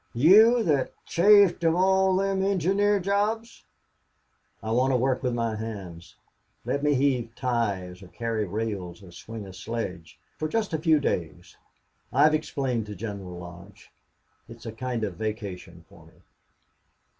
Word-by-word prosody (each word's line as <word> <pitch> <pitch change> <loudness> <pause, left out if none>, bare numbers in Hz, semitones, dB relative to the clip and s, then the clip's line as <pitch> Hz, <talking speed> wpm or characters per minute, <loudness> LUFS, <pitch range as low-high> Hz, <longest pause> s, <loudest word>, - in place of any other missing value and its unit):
You 215 - +6
that's 145 -7 +1 0.2
chafe 200 0 +5
of 165 0 +3
all 190 +1 +3
thim 195 0 0
engineer 195 +2 +2
jobs?" 210 +4 -2 1.0
"I 110 - -3
want 130 +3 +2
to - - +3
work 130 +1 0
with 125 -3 -1
my 115 -2 -1
hands. 100 -7 -8 0.5
Let 140 - -1
me 145 0 +2
heave 125 -4 0
ties 100 -8 -2
or 95 - -12
carry 115 +1 -3
rails 100 -2 -4
or 90 - -13
swing 110 +4 -9
a 95 - -10
sledge 95 -7 -6 0.2
for 155 - -1
just 215 +1 -2
a 160 - 0
few 160 -1 +3
days. 85 - -3 0.6
I've 155 0 +4
explained 135 -7 -2
to 105 - -7
General 100 -3 -7
Lodge. 90 +4 -12 0.6
It's 115 0 -12
a 115 - -4
kind 120 0 -4
of 95 -5 -4
vacation 100 -6 -6
for - - -18
me." - - -21
120 Hz, 150 wpm, -26 LUFS, 100-165 Hz, 1.0 s, You